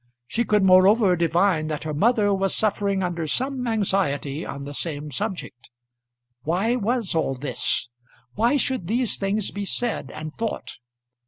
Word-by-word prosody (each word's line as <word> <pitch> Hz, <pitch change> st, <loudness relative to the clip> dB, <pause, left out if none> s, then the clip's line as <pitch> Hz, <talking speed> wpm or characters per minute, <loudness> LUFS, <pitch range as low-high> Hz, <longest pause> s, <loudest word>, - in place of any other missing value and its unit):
She 235 Hz, -, -1 dB
could 210 Hz, -2 st, +3 dB
moreover 190 Hz, +1 st, +6 dB
divine 170 Hz, -1 st, +2 dB
that 155 Hz, -1 st, -3 dB
her 155 Hz, -1 st, -3 dB
mother 205 Hz, +4 st, +3 dB
was 195 Hz, 0 st, 0 dB
suffering 200 Hz, -2 st, 0 dB
under 170 Hz, -3 st, -2 dB
some 260 Hz, -, -2 dB
anxiety 180 Hz, -9 st, 0 dB
on 140 Hz, 0 st, -6 dB
the 145 Hz, +1 st, -7 dB
same 150 Hz, -1 st, -4 dB
subject. 180 Hz, -, -5 dB, 0.7 s
Why 185 Hz, -, +1 dB
was 235 Hz, -2 st, 0 dB
all 160 Hz, -4 st, 0 dB
this? 130 Hz, -2 st, -2 dB, 0.5 s
Why 235 Hz, +7 st, +2 dB
should 260 Hz, -10 st, -1 dB
these 240 Hz, +3 st, 0 dB
things 200 Hz, +1 st, -1 dB
be 205 Hz, -, -4 dB
said 235 Hz, +4 st, -2 dB
and 155 Hz, 0 st, -7 dB
thought? 225 Hz, -1 st, -4 dB
195 Hz, 150 wpm, -24 LUFS, 155-220 Hz, 0.7 s, moreover